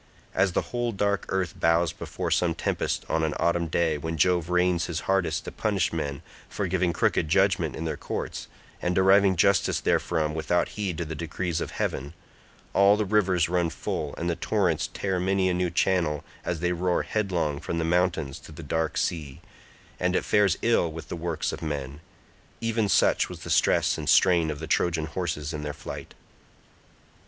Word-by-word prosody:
As 95 -1 +2
the - - +2
whole 120 -1 0
dark 100 -1 0
earth 95 -3 -2
bows 85 0 +3
before - - -5
some - - +2
tempest - - -2
on 80 - 0
an 80 -1 0
autumn 85 0 +1
day 80 -1 +1
when 80 +2 -4
Jove 90 +2 +2
rains 90 -1 +2
his 85 -1 -3
hardest 95 -2 0
to - - -5
punish 100 -6 0
men 75 -1 -3 0.3
for 100 - -2
giving 90 -1 +1
crooked 80 -1 +1
judgement 95 -3 +2
in 80 - -4
their 80 - -2
courts, - - -5 0.3
and 90 0 0
driving 95 0 +5
justice 100 +2 +3
therefrom 80 -3 0
without 80 +3 0
heed 95 -6 -3
to 85 - -2
the 80 - -5
decrees 85 +2 -3
of - - -3
heaven—all 85 +6 -1
the 105 - 0
rivers 95 -4 +2
run 90 -1 +1
full 75 -2 -4
and 85 - -3
the 85 - 0
torrents 90 -2 0
tear 95 -2 -2
many 95 +1 +1
a - - +1
new 90 0 0
channel 85 -4 +1 0.2
as 85 -3 -3
they 90 0 +1
roar 90 0 0
headlong 90 -9 -1
from 85 - -4
the 80 - 0
mountains 85 -5 0
to - - -13
the 80 +2 -9
dark 80 +1 -1
sea, 75 -6 -2 0.6
and 90 0 +1
it - - 0
fares 105 -4 +3
ill 115 -8 +2
with 80 0 -9
the - - -3
works 85 -1 -2
of - - -7
men—even 85 - -5
such - - +3
was - - -9
the - - -5
stress - - +3
and 75 -1 -3
strain 85 -2 +5
of 75 - -3
the 80 - -6
Trojan 80 0 +1
horses 75 -2 -3
in 75 - -4
their 75 0 -4
flight. 75 - -8
85 Hz, 185 wpm, -26 LUFS, 80-95 Hz, 0.6 s, driving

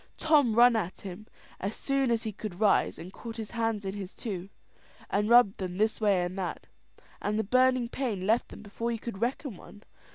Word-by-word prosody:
Tom 290 -8 +4
run 240 0 +7
at 190 -5 -2
him 195 +2 -8 0.3
as 200 +3 -3
soon 275 -2 0
as 230 -1 +1
he 220 - -3
could 205 -3 -7
rise, 215 -2 +3
caught 230 -1 -8
his 220 -2 -6
hands 225 -3 -1
in 190 - -3
his 200 -2 -7
own - - -29
two, 195 -5 -5 0.6
and 210 +2 +1
rubbed 235 -4 +6
them 180 -1 -4
this 215 +2 +1
way 200 -4 +3
and 175 +1 -4
that, 185 - -4 0.6
and 210 +1 -1
the 220 - +1
burning 255 +2 +3
pain 230 -7 -3
left 225 +4 +2
them - - -11
before 230 +3 -3
you 230 - -2
could 225 -3 -7
reckon 250 0 -2
one. 205 +4 -14
220 Hz, 205 wpm, -29 LUFS, 195-235 Hz, 0.6 s, run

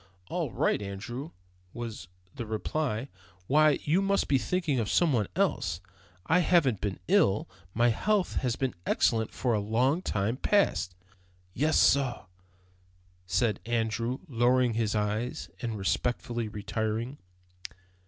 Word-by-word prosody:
"All - - -1
right, - - +1
Andrew," 115 +8 -6 0.4
was 115 -7 -6 0.3
the 115 - -6
reply. 115 +2 -2 0.4
"Why, 150 +5 +4
you 165 +6 +2
must 195 0 +1
be 135 - +3
thinking 165 -4 0
of 110 -3 -1
some 170 -5 +3
one 105 -5 +1
else. 125 - 0 0.5
I 170 +4 +4
haven't 155 - +3
been 100 -3 -2
ill. 100 +2 +3 0.3
My 120 +2 +4
health 195 - 0
has 125 -3 0
been 130 -2 -1
excellent 110 -2 +2
for 125 -2 0
a 105 - +2
long 125 - +1
time 110 - -1
past." 130 - +1 0.6
"Yes, 150 +7 +2
sorr," 135 -6 +3 1.0
said 100 +4 +1
Andrew, 115 +1 -1
lowering 125 -1 +2
his 110 -1 0
eyes 105 +3 -2
and 115 -3 -3
respectfully 120 +3 -1
retiring. 110 +5 -3
120 Hz, 130 wpm, -29 LUFS, 110-140 Hz, 1.0 s, Why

